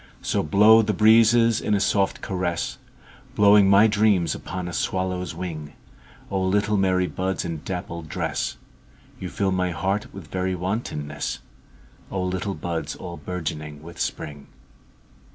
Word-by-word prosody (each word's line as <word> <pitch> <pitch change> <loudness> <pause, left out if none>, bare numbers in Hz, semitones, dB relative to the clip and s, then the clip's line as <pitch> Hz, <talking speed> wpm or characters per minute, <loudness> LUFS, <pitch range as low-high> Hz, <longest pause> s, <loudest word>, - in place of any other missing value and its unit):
So - - 0
blow 105 +7 +6
the 105 -1 0
breezes 115 +1 +5
in 105 - +1
a - - +1
soft 100 -1 +1
caress, 90 -3 -2 0.6
Blowing 100 -1 +6
my 100 +2 +7
dreams 105 -6 +3
upon 90 -1 -5
a 90 - -6
swallow's 90 -1 -2
wing;O 85 +3 -7
little 105 +3 +1
merry 95 -2 +2
buds 95 +1 -2
in 80 -3 -4
dappled 85 -3 -5
dress, - - -2 0.6
You - - -5
fill 95 -1 -1
my 90 -1 0
heart 95 +4 -2
with 95 -6 -11
very 95 0 -1
wantonness—O 90 -1 -6
little 95 +2 -2
buds 85 +1 -4
all 85 -2 -8
bourgeoning 75 -4 -5
with 85 +1 -11
Spring! 75 -2 -4
95 Hz, 135 wpm, -24 LUFS, 85-100 Hz, 0.6 s, my